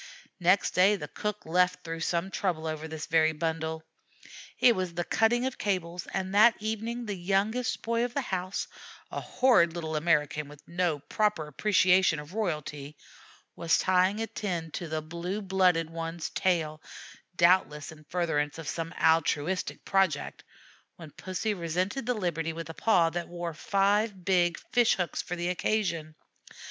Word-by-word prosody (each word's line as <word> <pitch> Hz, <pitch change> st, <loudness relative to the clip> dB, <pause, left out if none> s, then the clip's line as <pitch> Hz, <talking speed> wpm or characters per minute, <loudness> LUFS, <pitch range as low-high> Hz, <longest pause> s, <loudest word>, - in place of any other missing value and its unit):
Next 185 Hz, +2 st, +3 dB
day 190 Hz, +3 st, +4 dB
the 150 Hz, -7 st, -6 dB
cook 210 Hz, +7 st, -4 dB
'left' 180 Hz, +2 st, +2 dB
through 165 Hz, 0 st, -5 dB
some 170 Hz, +3 st, -1 dB
trouble 175 Hz, -6 st, -1 dB
over 155 Hz, 0 st, -4 dB
this 160 Hz, -1 st, -6 dB
very 160 Hz, 0 st, +3 dB
bundle. 160 Hz, 0 st, -3 dB, 0.7 s
It 240 Hz, -2 st, +5 dB
was 185 Hz, -2 st, -3 dB
the 175 Hz, -, -1 dB
cutting 235 Hz, +6 st, +2 dB
of 260 Hz, -, -3 dB
cables, 180 Hz, -3 st, -2 dB
and 190 Hz, 0 st, -3 dB
that 220 Hz, +3 st, +7 dB
evening 225 Hz, +3 st, -3 dB
the 210 Hz, -, -3 dB
youngest 200 Hz, +7 st, 0 dB
boy 230 Hz, +1 st, 0 dB
of 245 Hz, 0 st, -3 dB
the 280 Hz, -, +1 dB
house, 185 Hz, -5 st, -3 dB, 0.5 s
a -, -, -4 dB
horrid 235 Hz, -11 st, +3 dB
little 160 Hz, -2 st, -4 dB
American 150 Hz, -2 st, +1 dB
with 145 Hz, 0 st, -15 dB
no 170 Hz, -3 st, 0 dB
proper 190 Hz, +3 st, -1 dB
appreciation 185 Hz, +1 st, +3 dB
of 150 Hz, +3 st, -9 dB
royalty, 150 Hz, -8 st, -3 dB, 0.6 s
was 165 Hz, -1 st, +2 dB
tying 185 Hz, +3 st, +2 dB
a -, -, 0 dB
tin 175 Hz, -8 st, -4 dB
to 170 Hz, -, -5 dB
the 155 Hz, 0 st, -3 dB
blue 170 Hz, +5 st, -4 dB
blooded 185 Hz, -5 st, +2 dB
one's 165 Hz, 0 st, -4 dB
tail, 160 Hz, -4 st, 0 dB, 0.5 s
doubtless 170 Hz, -4 st, +3 dB
in 155 Hz, -1 st, -14 dB
furtherance 160 Hz, -4 st, -1 dB
of 165 Hz, -3 st, -7 dB
some 165 Hz, 0 st, -3 dB
altruistic 165 Hz, +2 st, +1 dB
project, 190 Hz, -7 st, 0 dB, 0.5 s
when 165 Hz, -3 st, -11 dB
Pussy 190 Hz, +6 st, -3 dB
resented 185 Hz, +8 st, -2 dB
the 250 Hz, -, +1 dB
liberty 165 Hz, -5 st, -2 dB
with 165 Hz, 0 st, -6 dB
a -, -, -11 dB
paw 170 Hz, -4 st, +3 dB
that 175 Hz, 0 st, -3 dB
wore 175 Hz, -1 st, -5 dB
five 200 Hz, +2 st, +1 dB
big 175 Hz, -2 st, +2 dB
fish 240 Hz, -2 st, +4 dB
hooks 180 Hz, -2 st, -2 dB
for 180 Hz, -, -5 dB
the 175 Hz, 0 st, -2 dB
occasion. 175 Hz, -5 st, -1 dB
175 Hz, 160 wpm, -28 LUFS, 160-195 Hz, 0.7 s, that